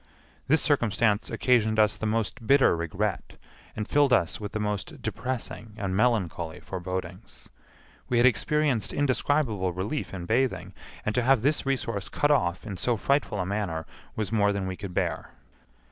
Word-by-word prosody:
This 155 +3 +3
circumstance 115 -6 +2
occasioned 110 -4 +2
us 105 -1 +4
the 110 - -3
most 115 +1 -2
bitter 135 -8 +5
regret 90 +4 -3 0.4
and 105 - -3
filled 145 -2 +3
us 85 -10 +2
with 105 - -5
the 110 - -3
most 105 - -3
depressing 115 -2 -4
and 95 -2 -2
melancholy 95 -7 0
forebodings. 95 +1 -6 0.6
We 125 - +2
had 120 - +5
experienced 130 0 +2
indescribable 130 -8 +1
relief 100 - -3
in 90 -3 -6
bathing, 125 +6 0 0.3
and 110 - 0
to 125 - +2
have 125 -1 +3
this 145 0 +1
resource 115 -7 -1
cut 145 - +1
off 90 -11 +1
in 100 -3 -5
so 120 +5 0
frightful 140 -2 0
a 90 - 0
manner 95 -5 -2 0.3
was 105 -4 -2
more 105 -2 +3
than 100 -1 -2
we 95 0 -3
could 95 -1 -8
bear. - - -2
110 Hz, 160 wpm, -27 LUFS, 95-130 Hz, 0.6 s, bitter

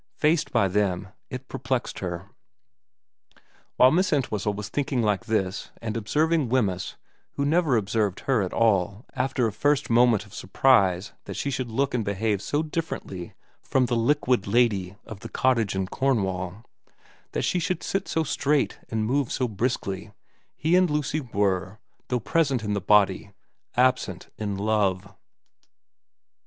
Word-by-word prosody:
Faced 155 +1 +1
by 100 - +3
them, 95 -1 0 0.2
it 130 0 -7
perplexed 125 0 -3
her. 90 0 -5 1.5
While 130 +1 +6
Miss 185 +3 +2
Entwhistle 110 -8 0
was 105 0 -5
thinking 135 -4 -1
like 105 +1 0
this 100 -3 -1
and 110 -1 -4
observing 150 +5 +1
Wemyss, 100 -8 0 0.4
who 140 - -1
never 155 -4 +3
observed 105 -2 0
her 130 -5 +1
at 95 - -2
all 100 -1 +1
after 130 -1 0
a 110 - -1
first 145 +4 +1
moment 115 -3 +4
of 105 - -17
surprise 95 -5 +2
that - - -6
she 140 - -2
should 130 -2 -3
look 135 +5 0
and 120 -3 0
behave 100 0 -1
so 145 +7 -1
differently 150 - -5 0.3
from 130 -1 +1
the 120 0 0
liquid 125 -2 +2
lady 100 -4 +2
of 110 - -9
the 115 - -8
cottage 115 -7 +1
in 95 0 0
Cornwall, 95 -4 -1 0.7
that - - -1
she 180 - +1
should 180 +1 -2
sit 195 0 -2
so 160 - 0
straight 145 -1 0
and 110 -1 -1
move 135 +2 0
so 130 - 0
briskly, 105 -3 -2 0.5
he 165 +3 +2
and 185 -1 +4
Lucy 150 0 0
were, 100 -5 -1 0.3
though 125 - 0
present 135 -1 +1
in 105 -1 -1
the 100 - -1
body, 100 -1 +3 0.5
absent 125 -7 +1
in 100 -2 -3
love. 100 -2 0
115 Hz, 150 wpm, -25 LUFS, 100-135 Hz, 1.5 s, While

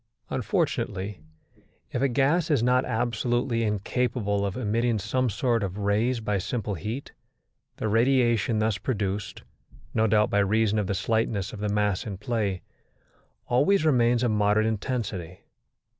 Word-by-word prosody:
Unfortunately, 100 -4 -1 0.7
if 120 - -2
a 140 - +4
gas 145 +6 +2
is 145 -7 +2
not 125 +1 +3
absolutely 120 +1 0
incapable 105 -1 0
of 100 - -5
emitting 115 0 0
some 130 +5 0
sort 115 +2 0
of 100 -1 -3
rays 105 +5 +1
by 105 -3 -1
simple 110 +2 -3
heat, 110 - -5 0.7
the - - -2
radiation 115 -1 +2
thus 110 -2 0
produced, 105 -3 -3 0.5
no 110 0 +2
doubt 105 0 +3
by 100 - +3
reason 110 +1 +2
of 100 - -1
the 100 - -1
slightness 100 0 -1
of 105 - -7
the 105 0 -1
mass 105 -1 0
in 100 -3 -5
play, 105 -3 -2 0.8
always 155 +9 +3
remains 120 -4 +3
of 120 - +2
moderate 105 0 +2
intensity. 105 -6 -3
110 Hz, 145 wpm, -26 LUFS, 100-120 Hz, 0.8 s, a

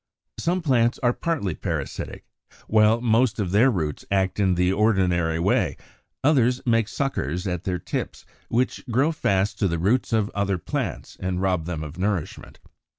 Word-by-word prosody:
81. - - -5
Some 180 +2 +1
plants 120 -5 +2
are 120 0 +3
partly 150 - -2
parasitic; - - -5 0.4
while 110 +1 +4
most 115 -1 +2
of 95 -4 -1
their 110 +7 +5
roots 80 - -2
act 95 0 0
in 95 -3 +3
the 90 +1 +2
ordinary 90 -6 +2
way, 85 - +1 0.5
others 130 -3 +3
make 115 -3 +2
suckers 90 - -2
at 90 -2 -3
their 90 -2 -1
tips 85 - -5 0.2
which 125 +2 0
grow 135 +7 +2
fast 100 -9 0
to 100 - +2
the 85 -1 -1
roots 105 +10 +1
of 110 -2 +1
other 100 -1 0
plants - - -4
and 90 -1 -2
rob 90 -4 0
them 80 -3 -4
of 75 +3 -8
nourishment. 95 -4 -3
100 Hz, 165 wpm, -24 LUFS, 90-120 Hz, 0.5 s, their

